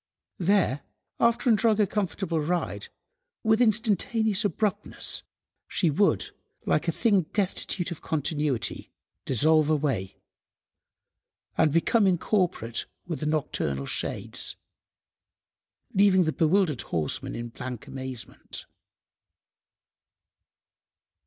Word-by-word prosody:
There, 180 -7 +2 0.4
after 235 +3 +3
enjoying 220 -1 +4
a 210 - +5
comfortable 190 -4 -1
ride, 155 - -2 0.6
with 220 +1 +3
instantaneous 220 -1 +2
abruptness 205 +1 -2 0.5
she 170 -5 +2
would, 150 - +2 0.3
like 155 +3 +1
a - - +3
thing 200 -3 +2
destitute 190 -2 0
of 170 - -6
continuity, 150 -5 -2 0.4
dissolve 155 +4 +3
away 135 -11 0 1.4
and 160 -2 +4
become 195 +7 +3
incorporate 175 - 0 0.2
with 165 -3 -4
the 150 - -2
nocturnal 70 - -1
shades, - - -3 1.4
leaving 190 -1 +5
the 160 -2 0
bewildered 165 - +2
horseman 80 -3 -2
in 120 0 -5
blank 125 0 -7
amazement. 130 -3 -7
170 Hz, 95 wpm, -27 LUFS, 145-205 Hz, 1.4 s, a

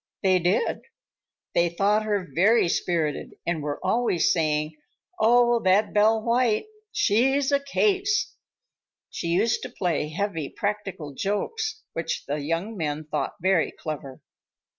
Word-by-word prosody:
They 185 -1 +4
did. 180 - 0 0.7
They 170 0 +3
thought 200 +5 +2
her 205 -4 -1
very 205 +5 +4
spirited 165 -5 -1
and 170 -2 -1
were 145 0 -3
always 230 -8 +2
saying, 155 -2 0 0.4
"Oh, 240 +1 +4
that 190 +3 +3
Belle 215 +1 +3
White, 235 - +2 0.3
she's 270 +6 +2
a 280 - +4
case!" 390 +8 +1 0.8
She - - -4
used 200 +8 +1
to - - -6
play 165 -5 -1
heavy 165 -3 -3
practical 200 -8 -4
jokes 435 - -2
which 165 - -3
the 145 +2 -2
young 165 +9 -2
men 155 -3 -3
thought - - -1
very 185 -3 +3
clever. 140 -4 -7
195 Hz, 130 wpm, -25 LUFS, 165-230 Hz, 0.8 s, They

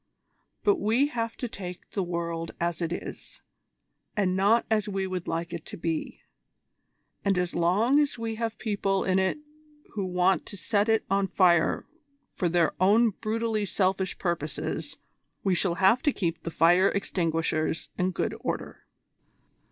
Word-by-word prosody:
But 410 -2 +4
we 255 +2 +2
have 230 -4 -3
to 245 - -3
take 180 -5 -8
the 200 - -1
world 170 -2 -3
as 170 -1 -1
it 165 -1 -1
is, 175 - -7 0.7
and 185 -3 +2
not 205 +5 +3
as 215 -1 +1
we 195 -1 -1
would 185 -2 -4
like 170 +1 -3
it 170 -2 -5
to - - -7
be; 165 -1 -3 1.0
and 195 -2 +2
as 180 -1 0
long 205 +11 +3
as 290 -4 +1
we 230 -1 -3
have 225 0 -3
people 200 -3 0
in 185 0 +2
it 190 +6 +1 0.6
who 205 - -2
want 180 +1 +2
to 200 - -7
set 205 +3 +1
it 220 0 +2
on 195 0 +1
fire 175 -4 +3 0.5
for 175 - 0
their 170 -1 +2
own 215 +5 +5
brutally 220 +1 -1
selfish 190 -1 0
purposes, 155 -2 -3 0.5
we 195 - +2
shall 175 -1 +1
have 190 +7 +4
to 295 - +3
keep 170 -8 -2
the - - -4
fire 175 +4 +4
extinguishers 165 -4 -1
in 180 0 +1
good 185 - -2
order." - - -5
190 Hz, 160 wpm, -27 LUFS, 170-215 Hz, 1.0 s, own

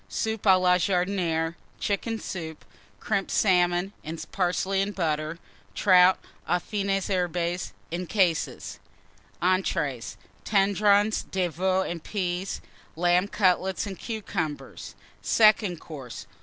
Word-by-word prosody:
Soup 220 -1 -2
à 190 -1 +7
la 180 0 +4
Jardinière. 175 -3 0 0.3
Chicken 225 +3 -1
Soup. 160 -7 -7 0.3
Crimped 200 -3 -1
Salmon 180 0 +2
and 160 +1 -6
Parsley 190 +1 0
and 200 +1 -2
Butter. 155 -2 -1 0.4
Trout 185 -2 +6 0.3
aux 175 - +3
fines 195 +1 -2
herbes, 180 -2 -1 0.2
in 175 +1 -3
cases. 180 -6 0 0.6
ENTREES. 165 -9 0 0.3
Tendrons 205 +1 +3
de 185 -2 0
Veau 185 +3 +1
and 170 -3 -5
Peas. 185 -2 -3 0.3
Lamb 175 +3 +2
Cutlets 190 -2 +1
and 195 -3 -7
Cucumbers. 190 -9 -5 0.3
SECOND 215 -5 +4
COURSE. 135 -8 -9
185 Hz, 110 wpm, -26 LUFS, 175-200 Hz, 0.6 s, à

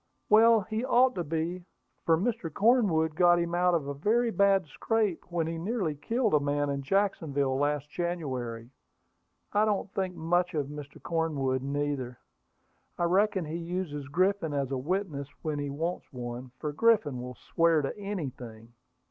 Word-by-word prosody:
"Well, 225 +1 +6
he 220 +3 -3
ought 255 0 +4
to 175 - -2
be; 165 +3 -3 0.4
for 165 -1 +5
Mr. 190 -4 -2
Cornwood 195 -7 +3
got 175 +2 +5
him 170 0 -1
out 180 0 +3
of 155 -4 -1
a 140 - -2
very 225 +11 +1
bad 200 -3 +3
scrape 210 +4 -1
when 170 -2 0
he 165 0 -4
nearly 190 -3 -1
killed 225 - -1
a 150 - +6
man 145 0 0
in 140 0 -2
Jacksonville 145 -6 0
last 145 0 0
January. 130 -10 -4 0.8
I 210 - +4
don't 205 -2 -1
think 185 -2 -2
much 175 +2 0
of 145 -2 -1
Mr. 145 -1 -9
Cornwood, 145 -6 -1
neither. 140 -3 -2 0.8
I - - -1
reckon 190 +1 +2
he 155 +2 -4
uses 170 -5 -4
Griffin 180 0 +1
as 140 -1 -1
a 135 - 0
witness 155 -2 -2 0.2
when 155 -2 -2
he 145 0 -3
wants 165 +6 -4
one, 125 -1 -6
for 150 -1 -4
Griffin 155 - +2
will 125 0 -7
swear 165 +4 +2
to 135 - -3
anything." 130 - -6
165 Hz, 165 wpm, -29 LUFS, 145-195 Hz, 0.8 s, Well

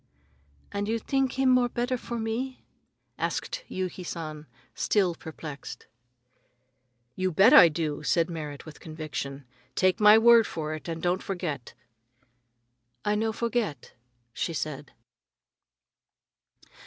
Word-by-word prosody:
"And 205 0 -2
you 225 +1 0
think 270 +3 0
him 265 -1 +3
more 250 -1 +4
better 245 +1 -1
for 235 -1 -5
me?" 235 +4 -3 0.5
asked - - -2
Yuki 185 0 -4
San, 155 -3 -6 0.3
still 190 -5 +1
perplexed. 155 -3 -9 1.3
"You 185 0 0
bet 195 +8 +6
I 170 - +10
do!" 155 -2 -3
said 165 +2 +2
Merrit 150 -4 -6
with 155 - -11
conviction. 150 -3 -6 0.3
"Take 185 +3 +2
my 210 0 +8
word 230 0 +6
for 155 -1 -4
it 155 - -7
and 165 -1 -5
don't 180 +2 +1
forget." 170 - -4 1.3
"I 210 - +2
no 220 +1 0
forget," 230 -8 -2 0.4
she 165 - -2
said. 145 -2 -4
185 Hz, 120 wpm, -27 LUFS, 155-225 Hz, 1.3 s, I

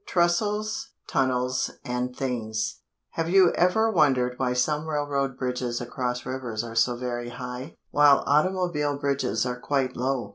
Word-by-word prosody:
TRESTLES, 210 +9 0
TUNNELS 130 -1 0 0.2
AND 125 0 -2
THINGS 110 -5 -2 0.3
Have 165 0 -2
you 185 -1 +6
ever 220 +6 +3
wondered 135 - +3
why 125 -2 0
some 150 +5 0
railroad 140 -3 -1
bridges 125 -2 -2
across 125 0 -3
rivers 120 -4 -3
are 115 -1 -7
so 115 +2 +2
very 120 -1 -4
high, 125 +3 -7 0.2
while 145 -1 +5
automobile 150 -2 +1
bridges 140 -6 0
are 125 0 -3
quite 135 -1 -1
low? 130 0 -1
130 Hz, 140 wpm, -26 LUFS, 125-150 Hz, 0.3 s, you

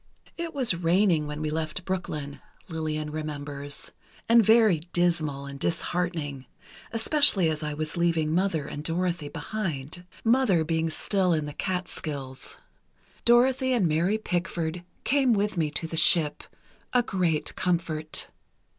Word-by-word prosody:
"It 335 -2 -5
was 255 -8 +3
raining 170 -2 +2
when 150 +1 -4
we 155 - -1
left 160 +3 -3
Brooklyn," 150 -6 -4 0.3
Lillian 155 -2 -3
remembers, 145 -2 -4 0.4
"and 230 0 +6
very 220 -5 +5
dismal 155 -5 0
and 140 0 -8
disheartening, 165 -6 -2 0.4
especially 225 - +5
as 155 0 -4
I 150 -1 -3
was 155 +1 -3
leaving 165 -2 +1
Mother 175 -4 +1
and 145 - -6
Dorothy 170 -2 -1
behind—Mother 180 - -1
being 160 0 0
still 185 +3 +1
in 155 -2 0
the 145 - -6
Catskills. 155 -8 -4 0.7
Dorothy 255 +2 +4
and 215 -8 +3
Mary 170 +7 +1
Pickford 175 -4 -2 0.2
came 270 -3 +3
with 205 -1 0
me 160 -3 0
to 150 +2 -3
the 165 0 -4
ship—a 165 +10 0
great 175 -8 -1
comfort." 165 -3 -1
165 Hz, 130 wpm, -27 LUFS, 155-190 Hz, 0.7 s, and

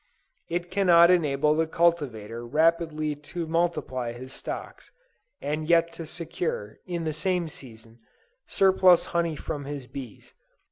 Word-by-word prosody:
It 175 +1 -3
cannot 175 -3 +6
enable 150 -4 +3
the 160 +1 +1
cultivator 130 -10 0
rapidly 155 +2 +1
to 150 +4 -6
multiply 155 -7 -1
his 130 +2 -9
stocks, - - -7 0.5
and 155 +2 -3
yet 170 0 +4
to 165 -1 -8
secure, 160 -10 -4
the 170 -3 -2
same 180 +2 0
season, 115 -5 -12 0.5
surplus 185 -2 +5
honey 170 -2 +1
from 145 -1 -5
his 140 -2 -6
bees. 125 -4 -10
160 Hz, 125 wpm, -26 LUFS, 135-170 Hz, 0.5 s, cannot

